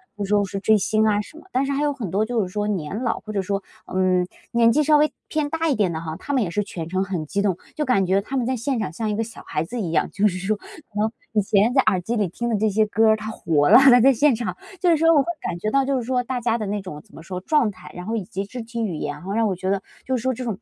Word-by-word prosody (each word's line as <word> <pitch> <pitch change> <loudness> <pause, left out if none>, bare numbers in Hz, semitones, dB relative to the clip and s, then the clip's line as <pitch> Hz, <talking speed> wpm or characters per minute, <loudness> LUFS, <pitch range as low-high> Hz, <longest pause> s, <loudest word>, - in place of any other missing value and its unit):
就 205 - -4
说 205 0 +2
是 195 +1 -4
追 215 +2 +4
星 215 +2 +1
啊 210 -1 +3
什 260 - -13
么。 - - -18
但 260 +2 +1
是 275 - -2
还 280 +1 0
有 295 0 +2
很 240 -11 -5
多 200 +4 +1
就 225 -1 0
是 - - -4
说， 210 0 -1
年 190 -1 -2
老， 235 -3 -1
或 215 - -8
者 200 - 0
说， 195 +1 -2 0.2
嗯， 185 -1 +1 0.2
年 235 -1 +4
纪 300 +5 +3
稍 300 +1 +5
微 300 0 +3 0.2
偏 305 -2 -1
大 325 +1 -1
一 - - +3
点 205 -7 +1
的 160 - -3
哈， 160 -1 -5
他 285 - -4
们 260 -4 +2
也 175 - -3
是 210 +4 0
全 170 -5 -6
程 185 +2 0
很 180 -5 -3
激 200 +6 -1
动， 195 -4 +1 0.2
就 305 - -1
感 250 -9 +2
觉 190 +2 +2
他 270 +7 -4
们 250 - 0
在 260 +2 0
现 250 +1 -2
场 190 -8 -3
像 220 +5 -2
一 210 - -1
个 225 - 0
小 225 0 -10
孩 150 - -1
子 230 +8 -5
一 180 - -2
样。 165 - 0
就 205 +1 +2
是 185 -3 -2
说 195 +4 -1
可 - - -19 0.3
能 215 +1 +1 0.2
以 215 - +3
前 205 +4 +2
在 270 - +5
耳 185 - +4
机 225 +7 -3
里 210 -4 +1
听 235 +7 -4
的 230 - +1
这 215 +1 +2
些 215 +2 +2
歌 220 +1 +3
儿， 220 - +5
它 215 +1 -5
活 150 -7 +1
了， - - +10
它 265 -2 +7
在 270 +3 +6
现 280 +1 +3
场。 235 +1 -3 0.2
就 355 0 +3
是 330 - +4
说 330 +2 +3
我 285 - +5
会 - - -14 0.2
感 180 -1 -3
觉 215 +5 -2
到 275 +2 +3
就 270 0 0
是 250 - -2
说 250 +1 0
大 255 0 -3
家 235 -1 0
的 215 - -3
那 205 +1 -2
种 150 -6 -8
怎 - - -20
么 160 - -11
说， 180 +1 -6
状 270 -1 +2
态 185 -2 -13
然 180 - -7
后 225 - -2
以 215 - -2
及 195 +3 -5
肢 245 +4 -7
体 230 0 -4
语 185 -7 -2
言 145 -1 -3
哈， - - -12
然 - - -12
后 195 - -3
让 225 +1 +2
我 195 - -1
觉 185 +2 -2
得 195 -1 0 0.2
就 260 - 0
是 245 - -2
说 260 +2 +1
这 255 +1 -5
种 225 -4 -3
215 Hz, 360 characters per minute, -23 LUFS, 190-250 Hz, 0.3 s, 了